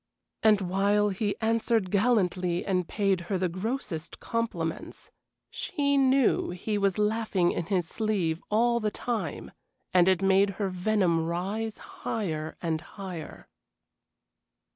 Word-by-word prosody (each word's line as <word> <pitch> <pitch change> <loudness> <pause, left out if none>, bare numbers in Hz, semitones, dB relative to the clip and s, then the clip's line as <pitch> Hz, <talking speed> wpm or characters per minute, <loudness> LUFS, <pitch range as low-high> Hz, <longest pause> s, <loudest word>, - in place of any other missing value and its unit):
And 215 -2 +5
while 200 +3 +2
he 200 +1 -1
answered 225 -3 +1
gallantly 185 -5 +1
and 180 -3 0
paid 195 -4 +1
her 195 - +1
the 185 0 +1
grossest 185 - -4
compliments, 180 -9 -4 0.4
she 285 -4 0
knew 270 -2 +3
he 180 +5 -3
was 195 -2 +1
laughing 210 -4 +1
in 170 - -3
his 185 -4 0
sleeve 185 -7 -1
all 235 +2 +3
the 215 -2 0
time, 230 +2 -4 0.4
and 180 -1 +5
it 190 0 +3
made 195 +1 +4
her 200 -2 0
venom 185 -3 +1
rise 200 +6 -2 0.2
higher 160 -8 -3
and 160 -2 -1
higher. 180 -2 -8
195 Hz, 125 wpm, -28 LUFS, 180-220 Hz, 0.4 s, And